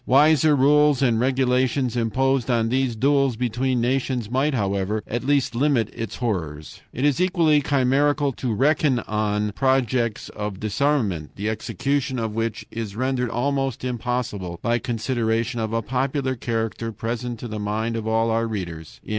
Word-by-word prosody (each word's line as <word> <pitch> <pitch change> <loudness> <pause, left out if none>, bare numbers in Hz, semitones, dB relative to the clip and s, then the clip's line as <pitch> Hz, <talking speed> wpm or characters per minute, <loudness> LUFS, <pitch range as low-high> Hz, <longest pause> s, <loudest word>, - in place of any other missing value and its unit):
Wiser 150 +2 +5
rules 145 0 +4
and 115 -4 +3
regulations 130 0 +1
imposed 130 +2 +1
on 115 -2 +2
these 130 -1 0
duels 135 +1 +2
between 125 +2 0
nations 125 -2 -1
might, 135 +3 +1
however, 100 0 -1
at 120 +2 -3
least 140 -3 +1
limit 125 -3 +1
its 115 - -5
horrors. 80 -11 -4
"It 130 - -2
is 145 +3 +2
equally 165 -5 +3
chimerical 140 +1 +2
to 125 - -2
reckon 135 - +2
on 105 0 -1
projects 125 -2 0
of 105 -2 -5
disarmament, 110 - 0
the 105 +2 -2
execution 130 +5 -2
of 110 -2 -2
which 115 0 -2
is 110 -3 -5
rendered 125 0 -1
almost 135 +1 -1
impossible 120 -7 -3
by 120 0 +1
considerations 115 0 -1
of 110 -1 -2
a 115 0 -1
popular 130 +2 -1
character 115 -1 -3
present 115 +2 -4
to 120 - -7
the 110 -1 -5
mind 110 +3 -2
of 110 -1 -3
all 115 +1 +2
our 115 +1 +1
readers. 85 -7 -6
120 Hz, 155 wpm, -23 LUFS, 110-135 Hz, -, Wiser